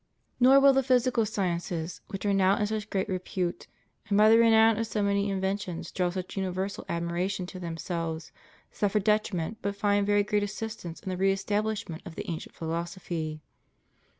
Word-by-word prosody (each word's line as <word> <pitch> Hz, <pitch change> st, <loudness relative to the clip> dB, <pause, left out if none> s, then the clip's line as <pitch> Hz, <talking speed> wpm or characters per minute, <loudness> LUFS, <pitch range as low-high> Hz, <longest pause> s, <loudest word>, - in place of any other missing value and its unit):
Nor 260 Hz, +2 st, +7 dB
will 275 Hz, 0 st, +7 dB
the 270 Hz, -, +3 dB
physical 250 Hz, -3 st, +2 dB
sciences, 175 Hz, -3 st, -2 dB
which 195 Hz, +1 st, -6 dB
are 200 Hz, -, +2 dB
now 195 Hz, 0 st, +4 dB
in 210 Hz, -, +1 dB
such 215 Hz, 0 st, -3 dB
great 190 Hz, 0 st, -1 dB
repute, 185 Hz, -2 st, -3 dB, 0.4 s
and 200 Hz, -, +3 dB
by 215 Hz, +1 st, +7 dB
the 225 Hz, -, +7 dB
renown 225 Hz, -1 st, +5 dB
of 225 Hz, -, -1 dB
so 215 Hz, -1 st, -1 dB
many 200 Hz, 0 st, +1 dB
inventions 190 Hz, -2 st, -3 dB
draw 180 Hz, -1 st, 0 dB
such 185 Hz, 0 st, -5 dB
universal 190 Hz, 0 st, -3 dB
ad 170 Hz, 0 st, -1 dB
miration 180 Hz, +2 st, -2 dB
to 185 Hz, -, -8 dB
themselves, 165 Hz, -1 st, -4 dB, 0.4 s
suffer 205 Hz, 0 st, +1 dB
detriment 210 Hz, -2 st, 0 dB
but 200 Hz, 0 st, -2 dB
find 205 Hz, -1 st, +1 dB
very 205 Hz, 0 st, +4 dB
great 210 Hz, 0 st, +1 dB
assistance 205 Hz, -4 st, -5 dB
in -, -, -6 dB
the 185 Hz, -, -2 dB
re 195 Hz, +1 st, +3 dB
establishment 205 Hz, -3 st, -2 dB
of 170 Hz, -4 st, -9 dB
the -, -, -6 dB
ancient 160 Hz, -, -7 dB
philosophy. 165 Hz, -1 st, -4 dB
195 Hz, 175 wpm, -28 LUFS, 175-210 Hz, 0.4 s, Nor